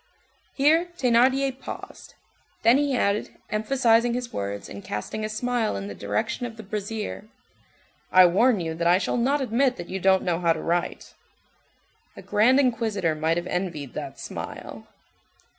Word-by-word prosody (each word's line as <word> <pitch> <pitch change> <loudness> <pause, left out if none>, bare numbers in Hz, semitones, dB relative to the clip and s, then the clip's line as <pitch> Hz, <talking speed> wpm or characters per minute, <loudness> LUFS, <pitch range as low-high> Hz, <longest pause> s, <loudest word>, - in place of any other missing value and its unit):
Here 315 +5 +3
Thénardier 260 +2 +2
paused; - - -9 0.5
then 235 +4 +6
he 285 -3 +1
added, 200 -1 -1
emphasizing 235 +1 +2
his 245 -1 -5
words, 100 0 -4
and 100 - -9
casting 105 - -5
a 215 - -2
smile 235 - -1
in 100 0 -5
the 100 - -6
direction 105 - -2
of 230 -1 -11
the 220 - -8
brazier:— 210 +1 -5 0.8
"I 185 0 +8
warn 210 +6 +3
you 165 -2 -3
that 170 +1 -1
I 175 +1 +5
shall 185 - -1
not 275 +4 +1
admit 250 +1 +1
that 175 - -8
you 190 - -3
don't 190 0 +3
know 175 -2 0
how 170 -2 +3
to 160 - -6
write." 170 +1 -2 1.0
A - - -10
grand 245 +6 +4
inquisitor 220 - +1
might 160 +2 0
have 175 - -2
envied 175 -7 -3
that - - -6
smile. - - -8
215 Hz, 160 wpm, -25 LUFS, 175-245 Hz, 1.0 s, I